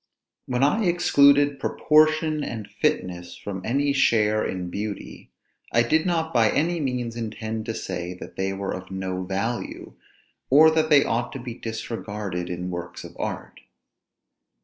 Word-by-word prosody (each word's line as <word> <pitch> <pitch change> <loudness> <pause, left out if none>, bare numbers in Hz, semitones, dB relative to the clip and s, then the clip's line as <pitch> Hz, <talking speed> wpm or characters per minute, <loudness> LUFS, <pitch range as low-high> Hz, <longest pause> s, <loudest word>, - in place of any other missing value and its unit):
When 125 +1 0
I 210 +10 +3
excluded 145 -5 +4
proportion 155 0 +3
and 110 -6 -5
fitness 90 -1 -2
from 95 -2 -6
any 140 +5 +1
share 110 -5 +3
in 90 -1 -4
beauty, 105 +1 -6 0.4
I 115 - +4
did 155 +8 +2
not 165 -3 0
by 115 -3 +4
any 170 +7 +1
means 125 -5 -2
intend 110 -1 -4
to 115 - -2
say 90 +1 -4
that - - -10
they 95 0 -1
were 95 0 -3
of 95 0 -7
no 95 -1 -3
value, 100 +6 -3 0.6
or 155 +4 +7
that 160 0 +1
they 145 -3 +6
ought 120 +2 -1
to 135 - -5
be 120 -1 -6
disregarded 105 -5 -5
in 90 +1 -4
works 85 0 -6
of - - -11
art. - - -5
115 Hz, 150 wpm, -24 LUFS, 95-145 Hz, 0.6 s, or